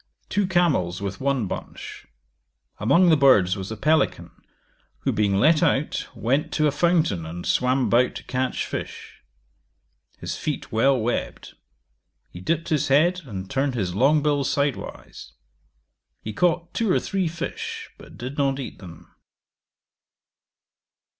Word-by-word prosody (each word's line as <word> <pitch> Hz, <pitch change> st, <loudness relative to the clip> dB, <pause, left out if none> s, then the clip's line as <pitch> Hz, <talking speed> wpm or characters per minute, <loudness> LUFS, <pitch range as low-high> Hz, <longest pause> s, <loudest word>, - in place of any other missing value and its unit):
Two 205 Hz, -2 st, +1 dB
camels 160 Hz, -, +1 dB
with 100 Hz, +2 st, -5 dB
one 135 Hz, -4 st, 0 dB
bunch. -, -, -7 dB, 0.7 s
Among 155 Hz, -, +4 dB
the 160 Hz, -, +6 dB
birds 105 Hz, -11 st, +5 dB
was 95 Hz, +1 st, -6 dB
a 110 Hz, -, -5 dB
pelican, 155 Hz, +7 st, +1 dB, 0.7 s
who -, -, 0 dB
being 100 Hz, -2 st, +1 dB
let 155 Hz, +10 st, +4 dB
out, 150 Hz, -3 st, 0 dB
went 140 Hz, +7 st, 0 dB
to 155 Hz, -, +2 dB
a 150 Hz, -, +3 dB
fountain, 155 Hz, -, +1 dB
and 85 Hz, +2 st, -7 dB
swam 125 Hz, +1 st, +2 dB
about 125 Hz, +2 st, +2 dB
to -, -, -7 dB
catch 130 Hz, 0 st, -2 dB
fish. -, -, -7 dB, 1.0 s
His -, -, -5 dB
feet -, -, -4 dB
well 130 Hz, +4 st, +3 dB
webbed: 115 Hz, +2 st, -3 dB, 0.8 s
he 90 Hz, -, -10 dB
dipped 165 Hz, -, -1 dB
his 150 Hz, -2 st, +1 dB
head, 170 Hz, +7 st, +3 dB
and 95 Hz, -6 st, -6 dB
turned 135 Hz, +3 st, -1 dB
his 95 Hz, -6 st, -2 dB
long 140 Hz, +8 st, +3 dB
bill 145 Hz, -2 st, +1 dB
sidewise. 140 Hz, 0 st, -3 dB, 0.9 s
He 110 Hz, -, -6 dB
caught 175 Hz, +5 st, 0 dB
two 225 Hz, -4 st, 0 dB
or -, -, +3 dB
three 190 Hz, -3 st, -1 dB
fish, 170 Hz, +1 st, -5 dB
but -, -, -14 dB
did 130 Hz, +4 st, -6 dB
not 135 Hz, -1 st, +1 dB
eat 135 Hz, -, -7 dB
them. 85 Hz, -4 st, -12 dB
135 Hz, 140 wpm, -24 LUFS, 110-155 Hz, 1.0 s, the